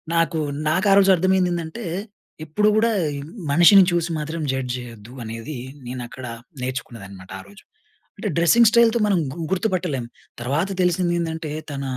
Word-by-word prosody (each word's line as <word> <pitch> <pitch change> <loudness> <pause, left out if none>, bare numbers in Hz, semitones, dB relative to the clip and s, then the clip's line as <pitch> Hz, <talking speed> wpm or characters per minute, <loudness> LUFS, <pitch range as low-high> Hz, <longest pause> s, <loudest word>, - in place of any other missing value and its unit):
నాకు 165 -1 +1 0.3
నాకారోజు 195 +3 +4
అర్థమైందేందంటే, 180 +1 0 0.6
ఎప్పుడు 210 +8 +1
కూడా, 230 +1 +3 0.6
మనిషిని 175 +6 +7
చూసి 170 0 0
మాత్రం 155 +2 -4
జడ్జ్ 130 -2 -2
జేయద్దు 120 -2 -10
అనేది, 115 +6 -6 0.3
నేనక్కడ 125 +1 -7 0.4
నేర్చుకున్నదనమాట 105 -7 -7
ఆ - - -8
రోజు. 100 0 -16 0.5
అంటే - - -3
డ్రెస్సింగ్ 225 +7 +6
స్టైల్‌తో 235 0 +4
మనం 195 -4 +2
గు 170 - -9
గుర్తుపట్టలేం. 180 - -1 0.4
తర్వాత 145 +10 -1
తెలిసిందేందంటే, 170 -3 -1 0.2
తన 140 -1 -4
165 Hz, 120 wpm, -22 LUFS, 130-185 Hz, 0.6 s, మనిషిని